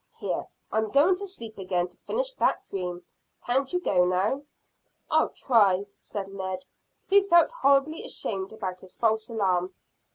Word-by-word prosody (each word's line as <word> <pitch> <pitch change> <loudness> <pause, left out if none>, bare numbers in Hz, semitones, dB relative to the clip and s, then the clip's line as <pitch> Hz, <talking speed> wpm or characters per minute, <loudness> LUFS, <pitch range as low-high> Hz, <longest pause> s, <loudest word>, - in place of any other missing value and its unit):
Here, - - -3 0.2
I'm 220 0 0
going 295 - +5
to 400 +1 -5
sleep 230 - -7
again 180 -1 -1
to - - -22
finish - - -1
that - - 0
dream. 180 -2 -4 0.4
Can't 265 +2 +1
you 360 - +1
go 185 - +3
now?" 185 +9 +1 0.7
"I'll - - +4
try," 200 -6 +3
said 200 -2 -5
Ned, 190 -1 -5 0.4
who 400 0 +5
felt 345 +4 +6
horribly 285 - +2
ashamed 195 -2 -3
about 185 -4 -5
his 185 - -14
false 220 0 +1
alarm. 185 -5 0
215 Hz, 155 wpm, -27 LUFS, 185-280 Hz, 0.7 s, felt